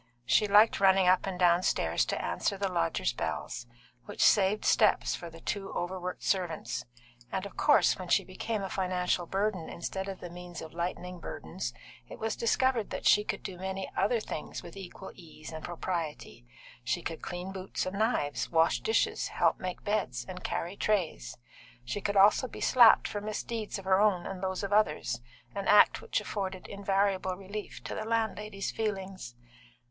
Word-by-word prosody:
She 210 - +4
liked 210 +2 +6
running 190 -1 +5
up 185 +1 +4
and 190 -2 -3
downstairs 175 0 +3
to - - -2
answer 200 - -1
the 200 0 0
lodgers' 85 - 0
bells, 120 - -4 0.4
which - - -1
saved 205 +1 +4
steps - - +4
for 170 - -6
the 165 0 -12
two 195 -1 -3
overworked 180 0 -4
servants; 180 -4 -1 0.5
and, 190 +1 -2
of 200 - -9
course, 295 - +4
when 185 - -6
she 195 +3 +3
became 200 +3 -4
a 195 - -3
financial 180 -2 0
burden 195 -3 -1
instead 190 +3 -4
of 190 - -6
the 175 - -8
means 175 -1 -8
of 160 - -9
lightening 180 +1 -4
burdens, 80 - -5 0.4
it - - -8
was 225 0 -2
discovered 235 -1 +1
that - - -5
she 210 - +6
could - - -4
do 180 -2 -6
many 190 0 -4
other 220 +5 +2
things 160 - -6
with 170 - -10
equal 190 0 -9
ease 160 -3 -11
and 160 -1 -7
propriety. 165 - -4 0.4
She - - -1
could - - -5
clean 180 +2 -5
boots 190 -1 -4
and 190 +2 -4
knives, 215 -11 0
wash 165 0 +3
dishes, 445 - +1
help - - +1
make 185 -1 -5
beds, 185 - -1
and 185 - -7
carry 175 +4 -3
trays; 175 - -1 0.5
she 200 +12 -3
could 200 +1 0
also 205 +6 +6
be - - -10
slapped 240 -3 +6
for 205 - -4
misdeeds 215 +1 -4
of 195 - -9
her 190 0 +4
own 195 -5 +3
and 190 -1 -5
those 190 0 -2
of 200 0 -2
others, 150 - +1 0.3
an 200 -1 -4
act 210 - +6
which 470 - -1
afforded 190 -2 -4
invariable 195 -1 0
relief 200 +3 -7
to - - -5
the - - -3
landlady's 215 -3 -2
feelings. 195 - -4
190 Hz, 175 wpm, -30 LUFS, 175-205 Hz, 0.5 s, liked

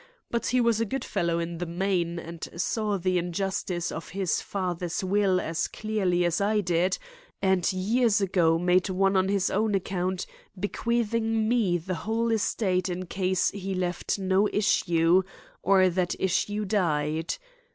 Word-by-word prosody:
But 235 - -1
he 250 - +2
was 230 -2 +2
a - - +2
good 270 +6 -3
fellow 170 -1 0
in 170 0 -3
the 175 - -3
main 175 -1 -1
and 170 0 -7
saw 210 +1 0
the 185 0 +1
injustice 180 0 -2
of 165 - -6
his 190 -2 -1
father's 180 -2 -3
will 190 -1 +2
as 165 -2 -1
clearly 190 -5 0
as 170 +2 0
I 210 +1 +2
did, 180 -1 +1 0.4
and 190 -1 +2
years 215 +4 +2
ago 175 -4 +2
made 180 +2 +2
one 195 +1 +2
on 190 0 +3
his 195 -2 +1
own 210 +1 +1
account 185 -1 -2 0.3
bequeathing 225 +1 0
me 220 -7 +2
the 180 +3 -4
whole 225 +6 -1
estate 190 -4 0
in 180 +1 -3
case 185 0 0
he 195 -1 -4
left 180 +1 -1
no 190 +1 +2
issue, 175 -4 +3 0.4
or 190 -1 +5
that 180 0 0
issue 205 +3 0
died. 160 -5 0
190 Hz, 155 wpm, -27 LUFS, 175-205 Hz, 0.4 s, or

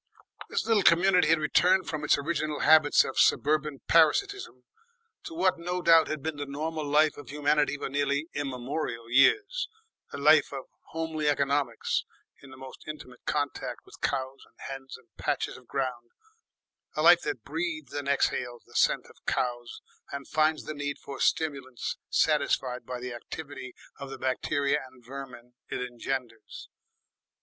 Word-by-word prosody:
This 465 -1 -1
little 225 -3 +3
community 180 -1 +5
had 165 +1 +5
returned 180 +4 +3
from 155 -2 -4
its 150 - +4
original 155 0 -2
habits 155 -1 +6
of 135 - -3
suburban 150 -1 +2
parasitism 395 - +2 0.6
to - - -7
what 185 +1 +2
no 180 +2 -2
doubt 165 -1 +6
had 155 -3 -4
been 160 -1 -3
the 145 0 -4
normal 155 +3 -3
life 150 +1 +3
of 145 - -10
humanity 145 0 +1
for - - -4
nearly 140 +1 0
immemorial 125 -3 -4
years, 415 - +3 0.4
a - - -6
life - - +5
of - - -5 0.2
homely 160 -2 -3
economies 140 0 +1 0.4
in 140 - -14
the 130 - -12
most 130 0 -11
intimate 130 -5 -9
contact 145 -1 -2
with - - -16
cows 135 0 -2
and - - -30
hens 135 -1 -8
and 130 - -23
patches - - -2
of 125 - -15
ground, 125 -3 -3 0.9
a - - 0
life - - +8
that - - -4
breathes 325 -3 -4
and 145 -1 -4
exhales 125 -3 0
the - - -20
scent - - +2
of - - -19
cows 120 -1 -2 0.3
and 140 -1 -6
finds 155 0 +1
the 155 - -5
need 145 -1 -4
for 140 - -9
stimulants 135 -6 -1
satisfied 135 -5 +1
by 125 -1 -4
the 125 0 -5
activity 130 +1 -8 0.2
of 140 -1 -7
the 135 - -7
bacteria 140 +3 0
and 125 -2 -21
vermin 125 -2 -9 0.2
it - - -3
engenders. 135 - -5
145 Hz, 160 wpm, -28 LUFS, 130-160 Hz, 0.9 s, life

